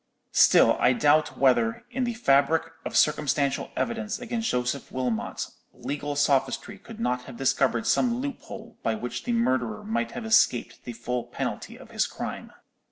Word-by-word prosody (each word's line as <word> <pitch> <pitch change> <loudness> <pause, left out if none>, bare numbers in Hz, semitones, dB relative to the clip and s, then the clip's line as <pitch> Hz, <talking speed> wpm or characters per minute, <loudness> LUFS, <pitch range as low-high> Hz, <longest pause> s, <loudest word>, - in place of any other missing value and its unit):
Still - - +6
I 125 - +4
doubt 150 +4 +2
whether, 120 -4 +2
in 250 +1 -1
the 240 -1 -3
fabric 160 - +2
of - - -1
circumstantial 140 -2 +1
evidence 225 -2 -2
against 235 -2 -3
Joseph 125 +2 -2
Wilmot, 125 -4 -2 0.3
legal 145 0 -4
sophistry 145 +8 0
could 225 +2 -12
not 125 - -1
have 125 -3 -10
discovered 130 -3 +1
some 240 -2 +2
loophole 245 -3 -7
by 115 - 0
which 120 +2 -5
the 245 - -1
murderer 210 - 0
might 230 +2 -2
have 240 -1 -6
escaped 220 - +2
the 120 - -5
full 120 +1 -3
penalty - - -5
of - - -14
his - - +1
crime. - - -6
145 Hz, 160 wpm, -26 LUFS, -, 0.3 s, Still